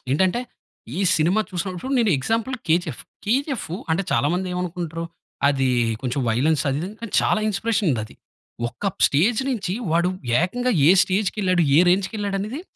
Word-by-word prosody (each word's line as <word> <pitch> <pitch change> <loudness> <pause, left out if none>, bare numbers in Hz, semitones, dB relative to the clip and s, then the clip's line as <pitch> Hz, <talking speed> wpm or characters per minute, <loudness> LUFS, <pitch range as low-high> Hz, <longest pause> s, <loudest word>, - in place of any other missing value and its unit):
ఏంటంటే 190 +9 +2 0.6
ఈ - - 0 0.2
సినిమా 170 +7 +2
చూసినప్పుడు 185 +7 -4
నేను 220 -4 +3
ఎగ్జాంపుల్ 230 - -1
'కేజీఎఫ్. 160 -5 0 0.2
కేజీఎఫ్' 255 - -1 0.2
అంటే 165 +4 +1
చాలా 130 +5 +2
మంది 185 +1 -2
ఏమనుకుంటరు, 170 -2 -4 0.4
అది 135 -2 +1 0.3
కొంచెం 130 +1 -1
వైలెన్స్ 140 +6 +2
అది 135 - -1
ఇది. 185 - -4
కాని 230 -2 -7
చాలా - - +2
ఇన్‌స్పిరేషన్ 215 -1 0
ఉంది 110 - -1
అది. - - -16 0.5
ఒక 200 +10 -3 0.2
స్టేజ్ 210 - +2
నుంచి 205 -7 -2 0.2
వాడు 170 +2 +2 0.3
ఏకంగా 245 +7 0 0.2
ఏ - - +8
స్టేజ్‌కెళ్ళాడు? 185 -2 +1
ఏ 165 - +8
రేంజ్‌కెళ్ళాడనేది 200 - -1
185 Hz, 145 wpm, -22 LUFS, 165-215 Hz, 0.6 s, ఏ